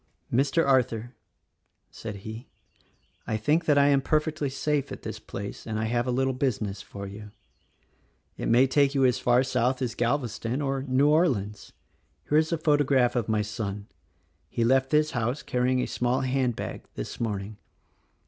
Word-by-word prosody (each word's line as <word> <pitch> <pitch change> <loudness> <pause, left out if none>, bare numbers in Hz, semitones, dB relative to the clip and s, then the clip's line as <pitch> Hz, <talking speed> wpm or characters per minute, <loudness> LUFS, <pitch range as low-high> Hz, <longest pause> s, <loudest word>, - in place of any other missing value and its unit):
"Mr. 140 +6 +2
Arthur," 120 -3 +1 0.8
said 110 -2 -7
he, 110 +4 -7 0.8
"I 110 - 0
think 150 +10 +1
that 150 -2 +3
I 140 0 +5
am 140 -1 +4
perfectly 155 0 0
safe 140 +1 -1
at - - -8
this - - -5
place, 100 +3 -7
and 110 -1 -2
I 110 - -1
have 120 +2 0
a - - +1
little 130 +1 +1
business 110 -6 -2
for 100 -1 -8
you. 105 +2 -9 1.1
It - - -4
may 120 +3 +6
take 140 +1 +2
you 135 -1 +4
as 125 -2 +2
far 125 +1 +3
south 130 0 0
as 125 -3 -2
Galveston 120 -1 -1
or 135 -2 -1
New 135 +2 +2
Orleans. 125 - +1 0.6
Here 150 - +4
is 160 +1 0
a 165 - +1
photograph 145 -5 +2
of 115 -2 -1
my 110 -1 +2
son. 105 -2 -4 0.6
He 115 - -1
left 130 +2 +3
this 150 +1 +2
house 120 +2 -2
carry 125 0 0
ing 130 - +1
a - - 0
small 125 +2 0
hand 130 -2 0
bag, - - -5
this - - -6
morning. 105 -2 -3
125 Hz, 175 wpm, -27 LUFS, 110-140 Hz, 1.1 s, may